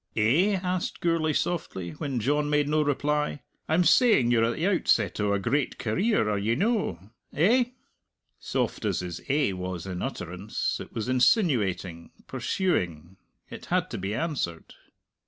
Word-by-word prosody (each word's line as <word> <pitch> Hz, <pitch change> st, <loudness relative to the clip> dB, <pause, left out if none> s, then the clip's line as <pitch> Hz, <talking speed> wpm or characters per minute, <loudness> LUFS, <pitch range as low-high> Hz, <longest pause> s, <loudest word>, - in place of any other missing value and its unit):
"Eh?" 150 Hz, -, +3 dB
asked 180 Hz, 0 st, -2 dB
Gourlay 165 Hz, -2 st, +1 dB
softly, 120 Hz, -, -2 dB
when 130 Hz, -, -3 dB
John 145 Hz, +5 st, +1 dB
made 150 Hz, -1 st, +2 dB
no 155 Hz, +1 st, +2 dB
reply; 150 Hz, 0 st, 0 dB, 0.3 s
"I'm 165 Hz, +3 st, +3 dB
saying 170 Hz, -, +5 dB
you're 115 Hz, -2 st, +4 dB
at 115 Hz, -, -1 dB
the 165 Hz, -, -2 dB
outset 195 Hz, -, +2 dB
o' 105 Hz, -1 st, +1 dB
a 100 Hz, -, +2 dB
great 125 Hz, +7 st, -1 dB
career; 155 Hz, -, +1 dB
are 105 Hz, -1 st, 0 dB
ye 110 Hz, +3 st, +1 dB
no? 135 Hz, -, -1 dB, 0.2 s
Eh?" 230 Hz, -, +4 dB, 0.7 s
Soft -, -, -2 dB
as -, -, 0 dB
his 90 Hz, -1 st, -6 dB
"Eh" 140 Hz, -5 st, +2 dB
was 90 Hz, -2 st, -5 dB
in 90 Hz, -2 st, -5 dB
utterance, 90 Hz, +4 st, -3 dB
it -, -, -9 dB
was 110 Hz, +1 st, -4 dB
insinuating, 120 Hz, -, +1 dB, 0.2 s
pursuing; 90 Hz, -, -2 dB, 0.3 s
it -, -, -9 dB
had -, -, 0 dB
to -, -, -4 dB
be 95 Hz, +3 st, -3 dB
answered. 125 Hz, -, -3 dB
130 Hz, 155 wpm, -27 LUFS, 95-160 Hz, 0.7 s, saying